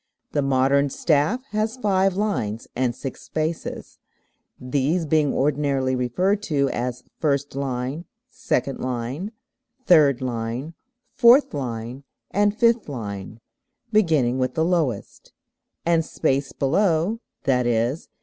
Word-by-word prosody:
The 145 - +1
modern 135 +1 +2
staff 155 - +1
has 215 +3 -1
five 195 -5 +2
lines 150 - -2
and 125 -2 0
six 135 0 -7
spaces, 160 +1 -4 0.6
these 140 +7 0
being 150 -1 +2
ordinarily 135 -2 +1
referred 180 - 0
to 140 -4 +1
as 125 0 -3 0.2
first 145 -2 0
line, 135 +4 -3 0.2
second 140 - -2
line, 130 - -3 0.5
third 145 -7 +5
line, 125 +4 -3 0.4
fourth 250 +3 +6
line, 125 -1 -5 0.3
and 205 +1 +2
fifth 230 -5 +3
line 105 -4 -6 0.5
(beginning 155 - +2
with 130 0 -1
the 160 - +2
lowest); 160 - -2 0.5
and 165 -1 +3
space 140 -4 -1
below 170 +7 +1 0.3
(_i.e. 125 0 +2
140 Hz, 110 wpm, -23 LUFS, 125-170 Hz, 0.6 s, fourth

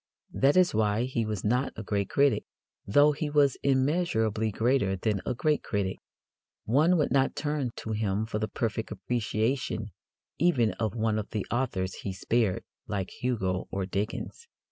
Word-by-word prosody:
That 140 +5 +3
is 185 -1 +5
why 105 +1 +2
he 120 -3 -1
was 105 -3 -3
not 125 +5 +1
a 110 - -6
great 100 -1 -1
critic, 140 -1 +3 0.4
though 145 +9 +5
he 150 +1 -3
was 145 -2 +4
immeasurably 130 - +1
greater 110 -2 +1
than 100 +1 -1
a - - 0
great 150 +4 +1
critic. 100 -3 -2 0.7
One 155 +10 +4
would 150 - +1
not 135 -1 +2
turn 145 -4 -1
to 110 - -6
him 105 -1 0
for 110 -1 -3
the 110 - -1
perfect 110 +1 -3
appreciation 110 +1 -1 0.5
even 130 -11 +3
of 110 0 -1
one 110 -1 +1
of 105 - -5
the 105 -3 -3
authors 110 -7 -1
he 95 - -4
spared, 105 0 0 0.2
like 95 -2 -3
Hugo 95 -7 -2
or 95 -1 -2
Dickens. 105 - -4
110 Hz, 165 wpm, -28 LUFS, 105-135 Hz, 0.7 s, is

